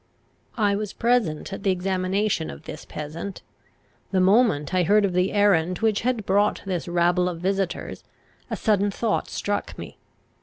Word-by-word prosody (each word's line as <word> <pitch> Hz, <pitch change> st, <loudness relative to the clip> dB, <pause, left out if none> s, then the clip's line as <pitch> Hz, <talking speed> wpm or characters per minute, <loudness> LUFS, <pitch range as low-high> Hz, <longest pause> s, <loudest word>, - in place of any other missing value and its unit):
I 205 Hz, -3 st, +2 dB
was 210 Hz, -1 st, -4 dB
present 225 Hz, -8 st, 0 dB
at 195 Hz, -, -6 dB
the 195 Hz, -, +1 dB
examination 185 Hz, -, 0 dB
of 70 Hz, -1 st, -9 dB
this -, -, -8 dB
peasant. 155 Hz, +6 st, -7 dB, 0.7 s
The 190 Hz, -, +1 dB
moment 190 Hz, -, +3 dB
I 185 Hz, -, +3 dB
heard 205 Hz, +4 st, +4 dB
of 190 Hz, -, -1 dB
the 180 Hz, +1 st, +2 dB
errand 185 Hz, -4 st, +3 dB
which 220 Hz, -1 st, +1 dB
had 240 Hz, -3 st, -1 dB
brought 205 Hz, +2 st, +2 dB
this 180 Hz, -3 st, -3 dB
rabble 175 Hz, +1 st, +2 dB
of 170 Hz, -2 st, -6 dB
visitors, 195 Hz, 0 st, -2 dB, 0.5 s
a -, -, -2 dB
sudden 205 Hz, -2 st, +2 dB
thought 215 Hz, +2 st, -1 dB
struck 205 Hz, 0 st, -3 dB
me. -, -, -9 dB
195 Hz, 160 wpm, -24 LUFS, 180-205 Hz, 0.7 s, heard